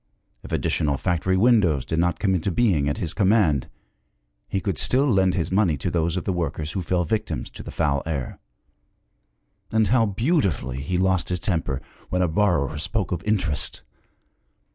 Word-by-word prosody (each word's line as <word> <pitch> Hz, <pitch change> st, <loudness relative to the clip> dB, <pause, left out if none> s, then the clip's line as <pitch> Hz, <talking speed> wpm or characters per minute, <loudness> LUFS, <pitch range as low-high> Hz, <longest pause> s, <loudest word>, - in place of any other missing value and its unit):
If -, -, -11 dB
additional 70 Hz, -2 st, 0 dB
factory 95 Hz, +2 st, 0 dB
windows 95 Hz, -, +3 dB
did 80 Hz, -, -1 dB
not 90 Hz, +1 st, +1 dB
come 95 Hz, -3 st, +1 dB
into 90 Hz, +1 st, 0 dB
being 85 Hz, -7 st, +2 dB
at 70 Hz, -, -2 dB
his 85 Hz, -1 st, -3 dB
command, 95 Hz, -, +2 dB, 0.8 s
he 95 Hz, -, 0 dB
could 95 Hz, -3 st, -2 dB
still 135 Hz, +3 st, +3 dB
lend 95 Hz, -8 st, +2 dB
his 85 Hz, -2 st, -1 dB
money 95 Hz, -6 st, +2 dB
to 75 Hz, +6 st, -3 dB
those 85 Hz, +1 st, 0 dB
of 90 Hz, -, -2 dB
the 95 Hz, -, -1 dB
workers 80 Hz, -3 st, -3 dB
who 95 Hz, -, -3 dB
fell 90 Hz, +1 st, 0 dB
victims 110 Hz, +6 st, -3 dB
to -, -, -10 dB
the -, -, -9 dB
foul 70 Hz, -1 st, 0 dB
air; 70 Hz, -6 st, -4 dB, 1.3 s
and 110 Hz, -1 st, +2 dB
how 115 Hz, -2 st, +3 dB
beautifully 95 Hz, -, 0 dB
he 90 Hz, +6 st, -2 dB
lost 95 Hz, -1 st, +1 dB
his 90 Hz, -1 st, -1 dB
temper 80 Hz, -7 st, -2 dB, 0.3 s
when 90 Hz, 0 st, +1 dB
a -, -, +2 dB
borrower 80 Hz, -5 st, +1 dB
spoke 100 Hz, +5 st, -2 dB
of 85 Hz, -2 st, -2 dB
interest! 90 Hz, -8 st, 0 dB
90 Hz, 175 wpm, -24 LUFS, 80-100 Hz, 1.3 s, windows